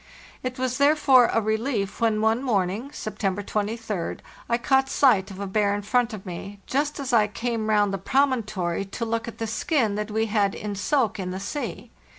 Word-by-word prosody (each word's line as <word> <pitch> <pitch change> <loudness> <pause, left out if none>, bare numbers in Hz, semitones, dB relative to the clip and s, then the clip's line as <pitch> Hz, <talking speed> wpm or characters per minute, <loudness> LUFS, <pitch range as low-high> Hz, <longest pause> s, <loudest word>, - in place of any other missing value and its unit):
It 255 +1 -4
was 255 0 -1
therefore 280 -4 +5
a - - +3
relief 220 -1 -1
when 220 -2 +2
one 220 +2 +2
morning 215 0 0
(September 205 -6 -3
23d) 210 -2 -3 0.3
I 235 - +3
caught 265 +2 +2
sight 215 -10 +4
of 195 -1 -9
a 200 - -3
bear 200 +1 +1
in 205 - -4
front 240 +3 +1
of 215 -3 -8
me, 195 +3 -7
just 290 +2 -1
as 270 -3 -3
I 215 -3 +5
came 225 +1 -2
round 205 -2 +3
the 195 - -2
promon 265 +2 +2
tory 180 -2 -2
to 200 +4 -5
look 230 0 -2
at 230 - -7
the 225 - -2
skin 230 0 0
that 210 +1 -3
we 220 +1 0
had 205 -2 +1
in 210 -1 -4
soak 220 +1 0
in 185 -1 -3
the 185 +1 -4
sea. 245 +9 -5
220 Hz, 200 wpm, -25 LUFS, 200-250 Hz, 0.3 s, therefore